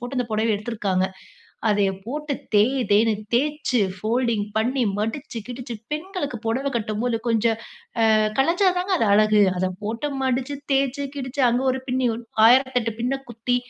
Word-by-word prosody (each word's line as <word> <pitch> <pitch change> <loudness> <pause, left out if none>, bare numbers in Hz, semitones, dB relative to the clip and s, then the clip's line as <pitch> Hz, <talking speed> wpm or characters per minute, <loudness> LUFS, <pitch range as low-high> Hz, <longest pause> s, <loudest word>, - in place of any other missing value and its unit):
போட்டு 245 +2 -4
அந்த 250 - 0
புடவ 220 +1 +1
எடுத்துருக்காங்க. 200 -4 -1 0.6
அதையப் 195 -2 +1
போட்டு 295 +3 -3 0.2
தேய் 250 +7 +4
தேய்ன்னு 215 +1 +4 0.2
தேச்சு, 275 -3 0 0.2
ஃபோல்டிங் 225 0 0
பண்ணி, 250 +3 +1 0.2
மடிச்சு 230 +4 -4
கிடிச்சு 245 -1 -6 0.2
பெண்களுக்கு 305 -4 -3
புடவ 260 +5 -1
கட்டும்போது 225 +2 -1
கொஞ்சம் 225 0 +2 0.6
அ - - +5 0.2
கலஞ்சாதாங்க 360 +4 +2
அது - - +2
அழகு. 215 0 +5 0.2
அத 185 - +1 0.2
போட்டு 230 +7 -2 0.2
மடிச்சு, 260 +2 -1 0.2
தேய்ச்சு, 275 +1 +1
கிடிச்சு, 270 +1 -4
அங்க 245 +2 +1
ஒரு 260 - -2
பின்னி 255 +1 0
உன் 230 +1 -8 0.2
1008 250 -1 +4
பின்ன 250 +3 0 0.2
குத்தி 235 +2 -1
245 Hz, 145 wpm, -23 LUFS, 220-270 Hz, 0.6 s, அ